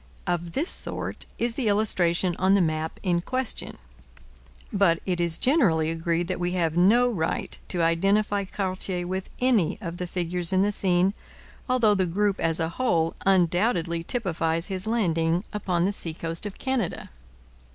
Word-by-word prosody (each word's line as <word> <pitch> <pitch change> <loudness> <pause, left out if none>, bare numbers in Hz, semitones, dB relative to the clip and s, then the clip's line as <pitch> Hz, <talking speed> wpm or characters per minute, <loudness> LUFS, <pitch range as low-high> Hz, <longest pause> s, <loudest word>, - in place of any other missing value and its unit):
Of 175 -1 -2
this 320 +6 0
sort - - -3
is 235 0 0
the 245 -2 -2
illustration 185 -4 +2
on 190 +1 +4
the - - +4
map 160 -2 -1
in 175 -3 +1
question. 255 +5 -3 1.0
But 190 -5 +3
it 180 -2 -1
is 170 -1 0
generally 175 - +3
agreed 165 +1 -1
that 185 - -3
we 175 0 -1
have 165 -3 0
no 215 +8 +5
right 170 -9 -2
to 175 -2 -1
identify 200 +4 +2
Cartier 185 -2 -2
with 185 +1 -4
any 240 -10 +2
of 175 -4 -6
the 180 - -4
figures 175 0 -1
in 190 0 +3
the 205 - +1
scene, 185 -1 +2 0.6
although 240 -4 +4
the 190 -2 +1
group 200 +3 0
as 165 0 0
a 160 -1 0
whole 170 -6 0
undoubtedly 175 -2 +2
typifies 165 -6 -1
his 190 0 -4
landing 170 -6 +1
upon 180 -4 0
the 200 - +1
seacoast 165 0 -3
of 200 - -9
Canada. 260 -9 -2
180 Hz, 160 wpm, -25 LUFS, 170-205 Hz, 1.0 s, no